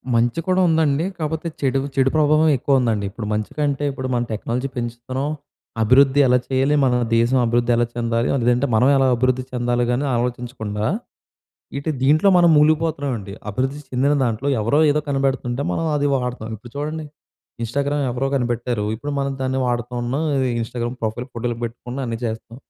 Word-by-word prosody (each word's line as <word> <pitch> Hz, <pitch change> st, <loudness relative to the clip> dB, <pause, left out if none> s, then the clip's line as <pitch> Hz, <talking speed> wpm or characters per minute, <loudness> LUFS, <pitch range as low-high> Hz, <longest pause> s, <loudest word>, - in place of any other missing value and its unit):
మంచి 120 Hz, +5 st, +2 dB
కూడా 185 Hz, 0 st, +3 dB
ఉందండి. 160 Hz, -1 st, +2 dB
కాకపోతే 160 Hz, +1 st, -3 dB
చెడు 135 Hz, -1 st, +1 dB, 0.2 s
చెడు 135 Hz, 0 st, +3 dB
ప్రభావం 155 Hz, +1 st, +4 dB
ఎక్కువ 140 Hz, +2 st, 0 dB
ఉందండి. 110 Hz, -5 st, 0 dB
ఇప్పుడు 105 Hz, 0 st, -6 dB
మంచికంటే, 140 Hz, +7 st, -2 dB
ఇప్పుడు 130 Hz, -1 st, -5 dB
మనం 120 Hz, 0 st, 0 dB
టెక్నాలజీ 120 Hz, +5 st, -2 dB
పెంచుతున్నాం, 120 Hz, +3 st, -3 dB, 0.5 s
అభివృద్ధి 135 Hz, +4 st, +5 dB
ఎలా 125 Hz, 0 st, +5 dB
చేయాలి, 135 Hz, +2 st, +2 dB
మన 130 Hz, -2 st, +3 dB, 0.2 s
దేశం 120 Hz, +3 st, +3 dB
అభివృద్ధి 120 Hz, +1 st, +1 dB
ఎలా 120 Hz, 0 st, +2 dB
చెందాలి, 115 Hz, 0 st, 0 dB, 0.2 s
లేదంటే 125 Hz, +3 st, +2 dB
మనం 125 Hz, +4 st, +4 dB
ఎలా 135 Hz, -1 st, +3 dB
అభివృద్ధి 130 Hz, +1 st, +1 dB
చెందాలి 120 Hz, -1 st, 0 dB
కానీ 125 Hz, +4 st, 0 dB
ఆలోచించకుండా, 120 Hz, -3 st, -3 dB, 0.9 s
ఇటు 140 Hz, +3 st, -2 dB
దీంట్లో 155 Hz, +8 st, +4 dB
మనం 175 Hz, -1 st, +6 dB
ములిగిపోతున్నామండి. 150 Hz, -9 st, +1 dB, 0.2 s
అభివృద్ధి 130 Hz, +7 st, -2 dB
చెందిన 135 Hz, +3 st, +2 dB
దాంట్లో 120 Hz, +4 st, -1 dB
ఎవరో 115 Hz, +7 st, +2 dB
ఏదో 150 Hz, +1 st, +2 dB
కనిపెడుతుంటే 135 Hz, -2 st, -1 dB
మనం 165 Hz, -, -1 dB
అది 145 Hz, 0 st, +1 dB
వాడుతాం. 125 Hz, -3 st, -3 dB
ఇప్పుడు 115 Hz, +3 st, -14 dB
చూడండి 155 Hz, +2 st, -3 dB, 0.6 s
ఇన్‌స్టాగ్రామ్ 140 Hz, +5 st, -1 dB
ఎవరో 125 Hz, +3 st, -1 dB
కనిపెట్టారు, 120 Hz, -3 st, -1 dB
ఇప్పుడు 145 Hz, +6 st, -5 dB
మనం 140 Hz, 0 st, -1 dB
దాన్ని 130 Hz, 0 st, -1 dB
వాడుతున్నాం, 120 Hz, +4 st, -2 dB, 0.4 s
ఇన్‌స్టాగ్రామ్ 120 Hz, +2 st, -4 dB
ప్రొఫైల్ 110 Hz, +3 st, -2 dB
ఫోటోలు 120 Hz, 0 st, -3 dB
పెట్టుకున్నా 120 Hz, +3 st, -6 dB
అన్నీ 115 Hz, -1 st, -3 dB
చేస్తాం. 115 Hz, +1 st, -5 dB
125 Hz, 155 wpm, -21 LUFS, 120-140 Hz, 0.9 s, మనం